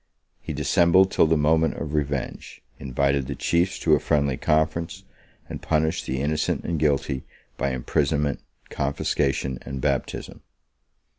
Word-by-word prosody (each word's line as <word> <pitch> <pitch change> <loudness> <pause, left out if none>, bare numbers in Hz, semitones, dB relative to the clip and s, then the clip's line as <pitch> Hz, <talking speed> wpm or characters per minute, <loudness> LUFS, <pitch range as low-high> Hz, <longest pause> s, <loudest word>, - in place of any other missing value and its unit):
He - - -6
dissembled 90 +3 +4
till - - +4
the 80 0 +3
moment 80 +2 +2
of 75 -2 -5
revenge; 70 -3 -3 0.2
invited 70 +1 0
the 70 - -4
chiefs 85 +3 +1
to 80 - +3
a 75 - +5
friendly 70 -3 +1
conference; 80 +7 0 0.4
and - - -7
punished 80 0 0
the 65 +1 -2
innocent 75 +2 -1
and 85 -2 -1
guilty 70 -3 0 0.3
by 70 - -1
imprisonment, 70 +2 0 0.3
confiscation, 70 -1 -1
and 70 0 -6
baptism. - - -2
75 Hz, 135 wpm, -24 LUFS, 70-80 Hz, 0.4 s, a